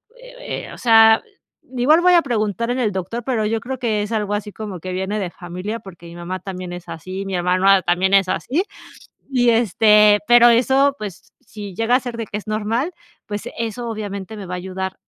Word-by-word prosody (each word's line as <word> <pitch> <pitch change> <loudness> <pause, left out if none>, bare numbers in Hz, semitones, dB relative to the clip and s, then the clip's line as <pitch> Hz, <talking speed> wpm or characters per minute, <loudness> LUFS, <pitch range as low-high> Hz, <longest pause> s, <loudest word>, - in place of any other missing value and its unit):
eh - - -8
eh, - - -11
o - - -11
sea, 225 -2 +6 0.5
igual 295 +7 +4
voy 360 0 +5
a 345 - +6
preguntar 230 - -2
en 245 - -1
el 235 -5 0
doctor, 190 +5 -4
pero 225 -4 0
yo 225 +1 -1
creo 255 +3 -6
que 220 -4 0
es 205 - -6
algo 210 -2 -1
así 210 0 -5
como 205 -4 -7
que 185 +3 -6
viene 190 +3 -2
de 190 -4 -3
familia, 180 +6 -6
porque 175 -5 -13
mi 170 0 -11
mamá 175 +2 -5
también 185 -2 -7
es 175 0 -8
así, 185 +4 -6
mi 195 - -5
hermano 185 +2 +3
también 185 +2 +1
es 195 -1 +4
así 290 - -1 0.7
y, 245 -3 +2
este, 210 -2 +5
pero 240 +1 +7
eso, 265 +4 +3
pues, 200 -5 -9
si 205 -3 -9
llega 225 +4 +2
a - - +4
ser 245 -2 -6
de 230 -2 -5
que 210 - -4
es 210 - -10
normal, 225 - -1 0.3
pues, 205 0 -5
eso 230 +1 -4
obviamente 210 -1 -6
me 200 - -7
va 180 - -7
a - - -2
ayudar 190 +1 -5
210 Hz, 215 wpm, -20 LUFS, 190-235 Hz, 0.7 s, pero